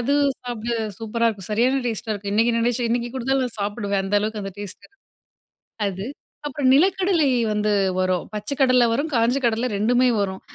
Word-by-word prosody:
அது 275 +4 +1 0.3
சாப்ட 240 -1 -4 0.3
சூப்பரா 230 +1 0
இருக்கும், 195 -3 -9
சரியான 255 +5 +2
டேஸ்ட்டா 220 0 -3
இருக்கும். 200 0 -5
இன்னைக்கு 230 +3 +3
நினைச்சேன் 240 0 0
இன்னைக்கு 240 0 -1
குடுத்தாலும் 265 +1 0
நான் 230 -3 -10
சாப்பிடுவேன். 200 -1 -1
அந்த 195 +2 +1
அளவுக்கு 215 0 -3
அந்த 195 - -6
டேஸ்ட் 205 -2 -8
இருக்கு 400 - -37 0.9
அது. 195 +1 -5 0.4
அப்புறம் 270 -2 +1
நிலக்கடலை 365 0 +3 0.2
வந்து 210 0 0 0.3
வரும். 185 -1 0
பச்சை 210 +5 -3
கடல 255 -2 +5
வரும், 285 +7 -1
காஞ்ச 235 +2 +2
கடல 235 +1 +1
2மே 245 +5 +3
வரும். 190 -1 -2
230 Hz, 170 wpm, -22 LUFS, 210-255 Hz, 0.9 s, கடல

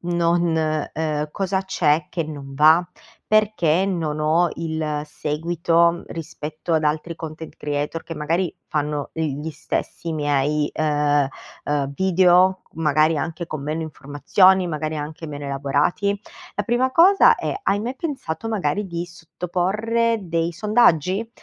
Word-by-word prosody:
non" 175 0 +1 0.5
uhm, 150 -1 -2
"cosa 190 +1 -1
c'è 160 -5 +1
che 165 -3 -2
non 145 -3 -8
va? 155 +5 +5 0.4
Perché 200 -5 +3
non 160 -5 -2
ho 160 +3 +3
il 160 -2 -2
seguito 170 +3 0
rispetto 160 0 -5
ad 155 - +1
altri 155 +2 -1
content 160 0 -8
creator, 150 +2 -3
che 165 - -6
magari 165 +4 -1
fanno 150 -1 -2
gli 155 -1 -3
stessi 160 +2 -4
miei, 145 0 0
uhm, 145 -2 +2 0.4
uhm, 140 -1 -1
video, 185 0 +4
magari 155 0 +2
anche 160 +3 -3
con 155 -3 -5
meno 155 +3 -3
informazioni, 160 +5 +2
magari 155 0 -3
anche 155 +2 -6
meno 145 -1 -7
elaborati?" 145 +9 0 0.3
La 205 - -1
prima 240 +4 +1
cosa 375 +6 +6
è: - - -3
hai 200 +1 +2
mai 245 +4 -4
pensato 260 - -4
magari 205 -2 -1
di 170 -1 -4
sottoporre 195 +7 -1
dei 165 -1 -1
sondaggi? 200 0 +2
165 Hz, 130 wpm, -22 LUFS, 150-185 Hz, 0.5 s, cosa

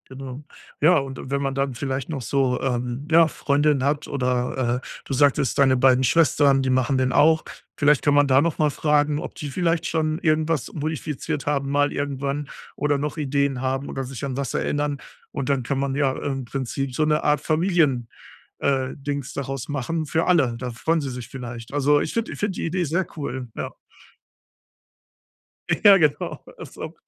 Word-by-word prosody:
Genau. 135 +1 -8 0.4
Ja, 165 +4 +6
und, 135 -2 -3
äh, - - -8
wenn 140 0 0
man 135 -1 -2
dann 135 -1 -1
vielleicht 135 +2 -3
noch 140 -5 -3
so, 130 +1 0
ähm, 125 +1 -2
ja, 165 0 +6
Freundinnen 145 -1 +1
hat 145 +1 0
oder, 125 -2 0
äh, - - -11 0.2
du 135 - -4
sagtest: 140 -2 +2
„Deine 135 -2 +4
beiden 130 0 +4
Schwestern, 140 -1 +4
die 130 - -1
machen 130 +1 +2
den 130 0 +1
auch“. 160 +1 +4 0.3
Vielleicht 145 0 +4
kann 145 - +3
man 145 -1 +4
da 135 +1 +5
noch 165 -1 0
mal 150 -1 +3
fragen, 150 0 +1
ob - - -7
die 145 - -6
vielleicht 170 +2 0
schon 155 0 0
irgendwas 155 -4 0
modifiziert 155 -1 -3
haben, 140 -1 0
mal 145 0 +2
irgendwann 140 0 -3 0.3
oder 145 -1 +1
noch 145 +1 -3
Ideen 140 -2 0
haben 135 +1 -2
oder 135 - -4
sich 135 +1 -6
an 130 -2 -3
was 140 -3 -3
erinnern. 145 -1 -1 0.3
Und 135 - -4
dann 140 -3 +1
kann 135 +2 -2
man 140 0 -1
ja 140 -2 +2
im 135 -1 -3
Prinzip 130 +1 -4
so 155 +4 +1
'ne 150 0 +1
Art 150 0 +3
Familien, 155 -8 +1 0.5
äh, 135 -2 +1
Dings 140 -1 -4
daraus 135 -1 -4
machen 155 +3 -2
für 160 +3 0
alle, 140 -10 +3
da 125 -1 -4
freuen 160 +8 0
sie 140 - -3
sich 125 -3 -7
vielleicht. 120 -2 -8
Also, 145 +1 +3
ich - - -3
finde 230 0 -2
ich - - -10
finde 205 -3 -1
die - - -2
Idee 175 +2 -1
sehr 170 +4 -1
cool, 130 -4 -4
ja. - - -4 2.1
Ja, 200 -2 +9
genau, 150 -5 0 0.2
das - - -9
ist - - -17
auch - - -6
140 Hz, 195 wpm, -23 LUFS, 130-150 Hz, 2.1 s, Ja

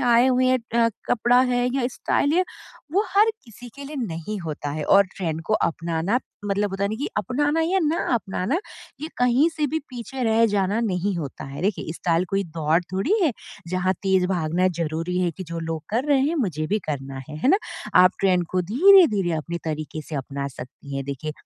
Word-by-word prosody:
आए 240 0 +4
हुए 255 0 +3
हैं 255 0 +3 0.3
अ, - - +4 0.2
कपड़ा 245 +1 +4
है 250 -1 +1
या 255 -3 +1
स्टाइल 285 +3 0
या 365 - +3 0.5
वो 395 +4 +3
हर 425 +3 +5
किसी 245 +1 -12
के 280 0 -9
लिए 295 +1 -7
नहीं 210 -3 -4
होता 150 -3 -4
है 150 0 -3
और 200 0 +6
ट्रेंड 165 -4 -2
को - - -1
अपनाना 170 +5 0 0.3
मतलब 205 0 0
होता 195 0 -3
है - - +1
ना 215 - -2
कि 285 - -2
अपनाना 290 +8 +1
या 355 +4 +2
ना 315 +2 0
अपनाना 215 - -1 0.4
ये 310 - -4
कहीं 250 +6 +4
से 305 -1 +1
भी 310 +3 -1
पीछे 255 +1 -6
रह 225 +1 +4
जाना 205 +1 +1
नहीं 200 -3 -1
होता 145 -6 -6
है। 140 +4 -7
देखिए, 190 -5 -1
स्टाइल 170 +1 0
कोई 195 0 +1
दौड़ 160 -1 +1
थोड़ी 195 - +1
है 310 - +3 0.4
जहाँ 185 +1 +1
तेज़ 190 -2 +2
भागना 180 0 +1
ज़रूरी 165 +3 -2
है 180 -1 +1
कि 175 +4 -8
जो 170 0 -6
लोग 160 -1 -4
कर 235 +5 0
रहे 275 -2 +4
हैं 335 - -1
मुझे 165 - -1
भी 210 +6 +1
करना 135 -2 -4
है, 150 - -7
है 255 - +1
ना? 380 - +6 0.4
आप 180 0 +7
ट्रेंड 180 -3 +2
को 185 - +1
धीरे-धीरे 245 - +5
अपने 170 +3 -4
तरीक़े 155 0 -4
से 155 - -9
अपना 140 +1 -4
सकती 135 +2 -9
हैं 135 - -3
देखिए, 140 +3 -5
195 Hz, 205 wpm, -23 LUFS, 165-250 Hz, 0.5 s, आप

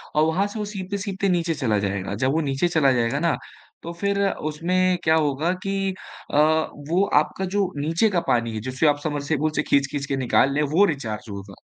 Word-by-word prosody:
और 155 - +4
वहाँ 185 +6 +1
से 215 +1 -7
वो 210 - -2
सीपते-सीपते 200 0 -3
नीचे 170 -2 +1
चला 110 -8 0
जाएगा। 100 -1 -2
जब 130 +5 +1
वो 160 - +1
नीचे 140 +4 0
चला 155 -6 +3
जाएगा 120 +3 +1
ना 170 0 +1 0.5
तो 170 - -5
फ़िर 200 +3 -1
उसमें 180 +4 0
क्या 160 0 +4
होगा 155 +1 +1
कि 195 0 -1 0.4
अ, - - +2 0.5
वो 180 +4 +3 0.2
आपका 190 +5 -4
जो 190 0 0
नीचे 165 +9 +2
का 180 - +1
पानी 115 -2 +1
है, - - -2
जिसे 130 +5 0
आप 145 -1 +3
सबमर्सिबल 150 0 -1
से - - +1
खींच-खींच 140 0 0
के 140 - -2
निकाल 130 +1 +3
रहे 150 - +1
हैं, 145 - -2
वो 195 +6 +5
रिचार्ज 115 - -4
होगा। 100 -1 -9
155 Hz, 205 wpm, -23 LUFS, 135-185 Hz, 0.5 s, वो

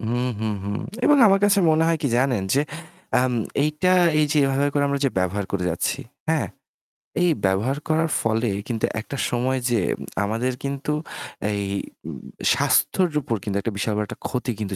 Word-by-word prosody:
হুম, 120 +2 -1
হুম, 110 -1 -1
হুম। 100 +1 -2 0.3
এবং 295 -1 +6
আমার 195 0 +5
কাছে 205 0 +4
মনে 155 +1 +3
হয় 165 - +2
কি 140 - +1
জানেন? 125 -5 +2
যে 140 - +4 0.6
আম 130 0 +1 0.3
এইটা 155 +4 +1 0.3
এই 155 - +5
যে - - 0
এভাবে 135 +1 +1
করে 145 -1 +2
আমরা 140 - 0
যে 135 - +3
ব্যবহার 95 +2 0
করে 90 -2 -1
যাচ্ছি, 85 - -1 0.3
হ্যাঁ? 160 -6 +2 0.8
এই 180 - +4 0.2
ব্যবহার 105 +9 +1
করার 160 +1 +2
ফলে 115 +1 +1 0.2
কিন্তু 115 -3 0
একটা 135 +5 -6
সময় 125 +2 0
যেয়ে 110 -7 +1 0.4
আমাদের 115 +5 -1
কিন্তু 140 +1 -2 0.6
এই 100 -1 -1 0.4
উম - - -6 0.3
স্বাস্থ্যের 180 -3 +2
উপর 115 -4 -2
কিন্তু 100 -2 -2
একটা 115 0 -3
বিশাল 105 +2 -1
বড় 105 - 0
একটা - - -9
ক্ষতি 125 -1 -2
কিন্তু 100 -2 -3
125 Hz, 180 wpm, -23 LUFS, 110-145 Hz, 0.8 s, এবং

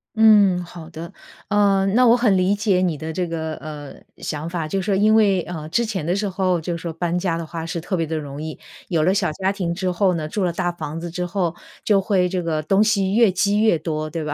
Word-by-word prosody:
嗯， 205 -5 +5
好 170 -2 -10
的， 170 +3 -8 0.4
呃， 200 -1 +3
那 245 +6 +4
我 235 +1 +6
很 220 -6 +3
理 185 +2 +2
解 200 -3 +1
你 175 -4 +1
的 160 0 -5
这 180 +2 -2
个， 160 -1 -4
呃， 150 -2 -9 0.2
想 155 +1 -5
法， 170 -2 -3
就 195 +5 -1
是 185 - -4
说 200 - +1
因 215 +2 +4
为， 200 -4 +4
呃， 160 -3 -7
之 235 +8 +1
前 190 -8 -3
的 175 +2 0
时 205 0 -1
候 185 -2 0
就 170 +1 -3
说 165 -1 -5
搬 175 +1 -1
家 175 -2 -1
的 165 - -4
话 165 0 -6
是 165 0 -4
特 185 +2 -2
别 165 - 0
地 160 +1 -4
容 145 -2 -5
易， 160 - -6 0.3
有 165 -3 +1
了 180 +4 +3
小 190 -5 +1
家 190 +4 -1
庭 180 -4 -2
之 185 +1 -2
后 185 +1 +2
呢， 155 -2 -3
住 195 +4 -2
了 175 -2 0
大 175 0 -1
房 165 -2 -6
子 170 0 -5
之 180 +1 -3
后， 175 -2 -2 0.3
就 205 -2 +3
会 190 -2 +1
这 180 -2 -2
个 155 -2 -1
东 195 +7 +3
西 200 -2 +1
越 230 -4 +5
积 200 +3 +1
越 215 -6 +4
多， 155 -1 -3
对 155 +1 -4
吧， 150 -1 -3
180 Hz, 275 characters per minute, -21 LUFS, 165-195 Hz, 0.4 s, 我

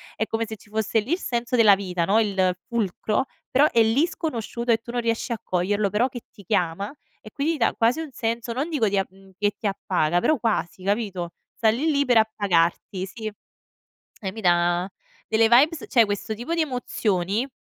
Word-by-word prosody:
È 220 - -1
come 225 0 -1
se 220 - -6
ci 205 - -20
fosse 220 +1 0
lì 230 +9 -5
il 355 - 0
senso 240 -5 -2
della 215 -4 +7
vita, 185 -3 -2
no, 205 +5 +3
il 190 -4 +1
fulcro. 220 +1 -1 0.3
Però 285 +4 +5
è 230 - +4
lì 230 +8 +3
sconosciuto 240 -7 -3
e 225 - +5
tu 230 +1 -10
non 245 - -1
riesci 230 +1 -1
a 230 - -2
coglierlo. 200 +3 0
Però 225 +5 +2
che 245 -1 -8
ti 200 - -15
chiama, 185 0 -1 0.3
e 215 - -12
quindi 290 +7 0
ti 305 - -5
dà 230 - +2
quasi 235 +7 +2
un 310 -4 -7
senso, 230 0 -3
non 270 +6 -2
dico 275 -10 +1
di 200 - 0
a 195 - +2
mhmm, 195 +1 -20
che 205 0 +1
ti - - -10
appaga 175 -4 0
però 310 - +2
quasi, 205 -5 -1
capito, 195 -4 -1 0.2
sta 225 - +3
lì, 260 +9 +1
lì 285 -1 +2
per 245 -3 +4
appagarti 190 -3 +1
sì. 215 +2 -6 0.9
Eh, 195 - -3
mi 220 - -7
da 175 0 +2 0.4
delle 225 0 +3
vibes 285 +6 +4
cioè 235 -3 +5
questo 205 +1 -3
tipo 240 +10 -4
di 335 - 0
emozioni, 220 - -1
220 Hz, 210 wpm, -24 LUFS, 195-240 Hz, 0.9 s, della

